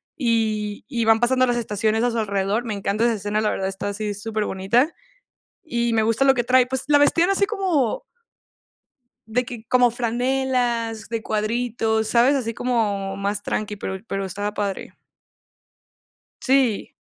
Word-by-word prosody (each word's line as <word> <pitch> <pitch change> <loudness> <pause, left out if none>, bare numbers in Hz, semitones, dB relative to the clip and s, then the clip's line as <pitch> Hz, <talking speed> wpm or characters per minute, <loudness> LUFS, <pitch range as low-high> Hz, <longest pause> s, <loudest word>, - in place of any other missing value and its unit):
y 215 -4 -1
y 235 -5 -1
van 225 0 +5
pasando 255 +1 +3
las 240 0 +1
estaciones 220 0 0
a 245 - +2
su 230 - -3
alrededor. 200 +2 0
Me 220 - -3
encanta 200 +3 0
esa 235 - +3
escena, 205 +1 -2
la 210 - +1
verdad 190 - -2
está 195 +1 -4
así 205 0 -3
superbonita 215 - 0 0.8
y 235 -1 +1
me 220 -1 +2
gusta 230 +4 +2
lo 270 - +6
que 240 -2 0
trae. 255 +1 +4
Pues, 265 0 -2
la 295 -1 +5
vestían 330 +5 +3
así 395 +1 +3
como 375 - 0 1.2
de 245 +3 0
que 235 -2 -8
como 250 -1 +4
franelas 240 -2 -1
de 230 -1 -2
cuadritos, 220 0 -1
¿sabes? 245 +5 +4
Así 230 -4 -2
como 205 -6 -1
más 200 +1 -2
tranqui, 210 -1 -3
pero 190 -1 -4
pero 195 0 -2
estaba 205 +3 -4
padre. 200 -2 -4 1.5
Sí, 260 -5 +1
225 Hz, 160 wpm, -22 LUFS, 210-250 Hz, 1.5 s, lo